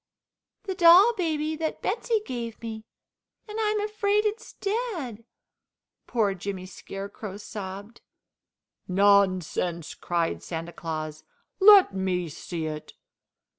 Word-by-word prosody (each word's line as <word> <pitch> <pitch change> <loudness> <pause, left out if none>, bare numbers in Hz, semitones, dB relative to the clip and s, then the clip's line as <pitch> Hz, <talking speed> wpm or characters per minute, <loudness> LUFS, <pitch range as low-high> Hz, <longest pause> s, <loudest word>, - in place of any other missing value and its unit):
"The 390 - -3
doll 365 +6 +7
baby 315 -5 -1
that 315 0 -3
Betsey 445 +1 0
gave 235 -3 -5
me, 220 -1 -7 0.6
and 425 +1 -5
I'm 425 0 +1
afraid 420 0 +1
it's 430 +2 -3
dead," 385 - -3 0.8
poor 215 -5 +1
Jimmy 190 0 -5
Scarecrow 195 +2 -8
sobbed. 205 +1 -8 0.9
"Nonsense!" 185 -4 +2
cried 170 -1 -1
Santa 165 0 -6
Claus. 155 -2 -5 0.4
"Let 395 - +8
me 185 -3 -1
see 160 +2 -5
it!" 155 -1 -6
220 Hz, 105 wpm, -26 LUFS, -, 0.9 s, Let